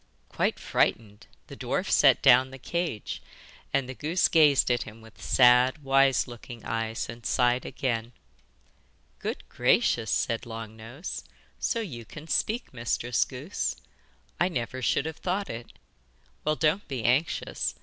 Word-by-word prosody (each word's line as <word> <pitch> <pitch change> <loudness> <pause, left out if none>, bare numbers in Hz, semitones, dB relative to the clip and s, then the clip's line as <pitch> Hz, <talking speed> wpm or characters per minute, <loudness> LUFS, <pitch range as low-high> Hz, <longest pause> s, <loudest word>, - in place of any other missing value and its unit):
Quite - - 0
frightened, 105 -2 -1 0.2
the - - -10
dwarf - - -2
set - - +5
down 130 +2 +6
the 135 - -10
cage, 165 - -3 0.5
and 135 -2 +1
the 130 - -5
goose 160 +7 +1
gazed 150 -6 +5
at 120 - +1
him 110 +1 -8
with 110 -1 -16
sad 125 +3 +5
wise 135 -1 +3
looking 120 -1 -10
eyes 115 0 -2
and 115 +1 -9
sighed 125 +1 +2
again. 120 -4 -2 1.1
'Good - - -5
gracious!' 110 -2 +2
said 115 +2 0
Long 115 -1 -7
Nose. 120 +9 -7 0.4
'So 230 - 0
you 130 - -6
can 155 +7 -11
speak, 225 - -1
Mistress 120 0 0
Goose. - - -3 0.6
I 175 - +4
never 130 -4 -3
should 135 - +1
have 160 0 -5
thought 190 +2 -2
it! 115 +1 -8 0.7
Well, 155 0 +1
don't 160 +6 +1
be 130 -5 -4
anxious. 130 +7 0
125 Hz, 145 wpm, -27 LUFS, 115-150 Hz, 1.1 s, down